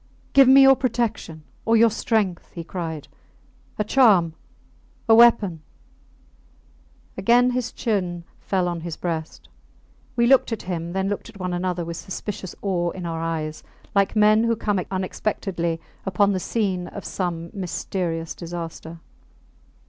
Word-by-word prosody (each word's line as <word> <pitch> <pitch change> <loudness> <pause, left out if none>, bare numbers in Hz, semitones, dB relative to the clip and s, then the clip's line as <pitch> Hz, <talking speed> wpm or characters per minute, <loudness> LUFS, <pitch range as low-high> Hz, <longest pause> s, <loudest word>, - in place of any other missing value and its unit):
Give 275 -1 +7
me 270 +1 +8
your 270 0 +8
protection 235 - -2 0.2
or 225 0 +3
your 230 0 +5
strength! 210 -5 -1
he 170 - -6
cried. 165 -4 -5 0.7
A 210 - +1
charm... 205 -9 +4 0.7
a 225 - +6
weapon! 225 -8 +5 1.6
Again 240 +6 +4
his 250 -1 -2
chin 180 -6 -2 0.2
fell 185 -2 -1
on 170 -1 -3
his 170 -1 -6
breast. 160 -2 -5 0.7
We 235 - +3
looked 260 0 +4
at 225 - -3
him, 170 -2 -4
then 190 0 -1
looked 205 +3 -4
at 210 -3 -14
one 180 -1 -3
another 175 -1 -2
with 170 0 -5
suspicious 190 -1 -6
awe 175 -3 0
in 180 0 -7
our 165 -1 -3
eyes, 155 -2 -3 0.3
like 200 +1 +2
men 215 +1 +5
who 230 0 +2
come 205 -3 -1
unexpectedly 185 -3 -2 0.2
upon 200 +1 +2
the 185 - -1
scene 185 -3 -1
of 205 - -9
some 170 -3 -3
mysterious 175 -3 -3
disaster. 165 -1 -7
185 Hz, 140 wpm, -23 LUFS, 170-220 Hz, 1.6 s, me